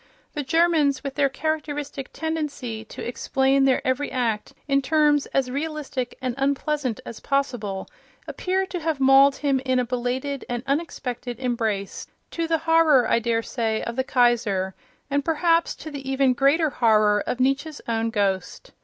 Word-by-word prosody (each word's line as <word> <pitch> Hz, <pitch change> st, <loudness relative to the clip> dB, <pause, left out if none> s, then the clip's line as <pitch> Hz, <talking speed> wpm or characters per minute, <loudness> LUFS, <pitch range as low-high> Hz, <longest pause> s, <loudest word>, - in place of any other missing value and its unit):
The 295 Hz, -, -2 dB
Germans, 310 Hz, -2 st, +2 dB
with 275 Hz, -1 st, -4 dB
their 280 Hz, -1 st, +2 dB
characteristic 290 Hz, -2 st, -3 dB
tendency 290 Hz, -8 st, -4 dB
to -, -, -7 dB
ex 240 Hz, -, -6 dB
plain 270 Hz, 0 st, +3 dB
their 270 Hz, +1 st, +2 dB
every 260 Hz, +2 st, 0 dB
act 230 Hz, -5 st, -1 dB, 0.2 s
in 275 Hz, -1 st, +2 dB
terms 295 Hz, 0 st, +2 dB
as 260 Hz, -2 st, -1 dB
realistic 285 Hz, -3 st, -4 dB
and 255 Hz, -1 st, -2 dB
unpleasant 280 Hz, -2 st, -1 dB
as 230 Hz, -, -8 dB
possible, 245 Hz, -9 st, -2 dB, 0.4 s
appear 380 Hz, +1 st, -1 dB
to 370 Hz, -1 st, -5 dB
have 320 Hz, -3 st, -2 dB
mauled 270 Hz, +1 st, +6 dB
him 275 Hz, -2 st, +1 dB
in 260 Hz, -1 st, +1 dB
a 250 Hz, -, +1 dB
belated 250 Hz, +3 st, -2 dB
and 240 Hz, 0 st, -3 dB
unexpected 260 Hz, -5 st, -3 dB
embrace, 225 Hz, -6 st, -2 dB, 0.2 s
to 335 Hz, -1 st, -2 dB
the 325 Hz, 0 st, +2 dB
horror, 320 Hz, -6 st, +4 dB
I 230 Hz, -, +3 dB
daresay, 230 Hz, -1 st, -1 dB
of 235 Hz, -, -4 dB
the 260 Hz, -, 0 dB
Kaiser, 230 Hz, -7 st, +1 dB, 0.4 s
and 285 Hz, 0 st, +1 dB
perhaps 330 Hz, +1 st, +2 dB
to 315 Hz, -, -9 dB
the 275 Hz, -2 st, -6 dB
even 270 Hz, -1 st, +3 dB
greater 285 Hz, +4 st, +3 dB
horror 215 Hz, -4 st, +3 dB
of 250 Hz, -, -2 dB
Nietzsche's 275 Hz, +4 st, 0 dB
own 230 Hz, 0 st, 0 dB
ghost. 200 Hz, -, -2 dB
270 Hz, 160 wpm, -24 LUFS, 240-295 Hz, 0.4 s, mauled